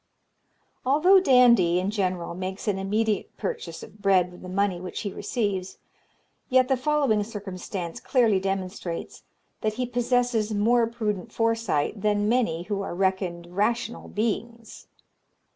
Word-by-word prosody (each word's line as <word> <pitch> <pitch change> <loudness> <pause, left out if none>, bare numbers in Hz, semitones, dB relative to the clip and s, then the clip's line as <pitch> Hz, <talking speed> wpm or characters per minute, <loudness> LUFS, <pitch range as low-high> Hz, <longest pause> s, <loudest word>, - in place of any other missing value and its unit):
"Although 310 +9 +5
Dandie, 240 - +5
in 190 +2 -1
general, 185 -5 -2
makes 185 +3 -5
an 195 -2 +1
immediate 210 +2 -1
purchase 475 -1 -5
of 210 - -14
bread 185 -3 +3
with 180 - -14
the 185 - -8
money 190 -1 0
which 180 - -5
he 200 - -4
receives, 200 -6 -2 0.7
yet 255 -1 +4
the 265 - +4
following 260 -5 +1
circumstance 190 -4 -6
clearly 230 -7 +2
demonstrates 185 -2 -4 0.4
that 215 -1 0
he 250 +1 -1
possesses 245 -3 0
more 230 +3 +3
prudent 220 -2 -3
foresight 225 -7 0
than 205 0 +1
many 215 -9 +1
who 200 +1 -3
are 195 - -4
reckoned 180 -2 -1
rational 230 +3 -1
beings. 230 +1 -4
210 Hz, 135 wpm, -26 LUFS, 185-235 Hz, 0.7 s, Although